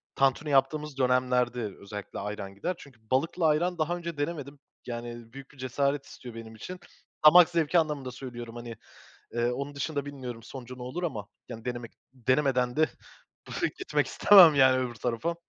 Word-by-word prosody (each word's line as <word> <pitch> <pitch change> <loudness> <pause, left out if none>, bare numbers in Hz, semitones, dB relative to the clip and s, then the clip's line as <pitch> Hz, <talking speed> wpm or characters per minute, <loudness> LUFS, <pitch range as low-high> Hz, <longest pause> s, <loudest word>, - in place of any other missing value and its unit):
Tantuni 135 +3 +2
yaptığımız 145 +1 +1
dönemlerde 125 -1 +2 0.2
özellikle 100 0 -7
ayran 100 -1 -5
gider. 180 - -2
Çünkü 135 -5 -15
balıkla 160 +5 +2
ayran 175 +4 +1
daha 165 +2 0
önce 170 -2 -6
denemedim. 145 -2 -4 0.3
Yani, 120 -1 -7
büyük 135 0 -11
bir - - -20
cesaret 140 +2 -1
istiyor 120 -2 -11
benim 115 -1 -9
için. 180 - -8 0.5
Damak 170 +3 +9
zevki 170 0 +2
anlamında 150 -5 -2
söylüyorum, 120 -2 -8
hani, 120 -1 -7 0.6
eee, 120 0 +1
onun 140 +3 -4
dışında 140 0 -2
bilmiyorum 125 -5 -7
sonucu 125 +1 -9
ne - - -7
olur 130 +8 -5
ama, 110 - -3 0.2
yani, 115 -3 -8
denemek 120 -1 -5 0.2
denemeden 130 0 +1
de 155 0 +4 0.6
bu - - -8
fikri, - - 0
gitmek - - 0
istemem, 180 -7 +8
yani, 130 -1 +5
öbür 125 -2 -2
tarafa. 120 +8 -2
130 Hz, 165 wpm, -28 LUFS, 120-150 Hz, 0.6 s, Damak